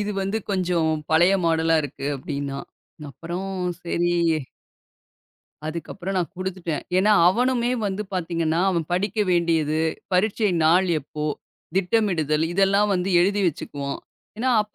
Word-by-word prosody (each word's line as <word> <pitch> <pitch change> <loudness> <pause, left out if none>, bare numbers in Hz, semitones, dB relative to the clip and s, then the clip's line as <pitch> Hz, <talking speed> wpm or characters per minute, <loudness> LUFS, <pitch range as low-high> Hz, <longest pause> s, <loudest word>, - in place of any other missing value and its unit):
இது 210 0 -2
வந்து 195 +3 -1
கொஞ்சம் 180 -4 +1 0.2
பழைய 175 +4 +5
மாடல்லா 165 0 +3
இருக்கு 140 0 -6
அப்படின்னா. 140 0 -4 0.5
அப்புறம் 175 +7 -5 0.4
சரி 175 0 0 1.5
அதுக்கப்புறம் 175 +4 -5
நான் 175 - -2
குடுத்துட்டேன். 185 -4 -3 0.2
ஏன்னா 210 +3 +4 0.2
அவனுமே 245 +3 +1 0.2
வந்து 195 +2 -2
பாத்தீங்கன்னா, 165 -1 0
அவன் 170 -3 0
படிக்க 200 +4 -1
வேண்டியது, 160 -3 +2 0.3
பரிட்சை 205 +3 +2
நாள் 180 +4 +4
எப்போ? 150 +2 -6 0.5
திட்டமிடுதல் 175 -7 +1
இதெல்லாம் 200 +2 +3
வந்து 180 +1 -1
எழுதி 200 +3 +2
வச்சுக்குவான். 140 -3 -3 0.4
ஏன்னா 255 +3 +1
அப்ப 210 - -18
180 Hz, 120 wpm, -23 LUFS, 160-195 Hz, 1.5 s, பழைய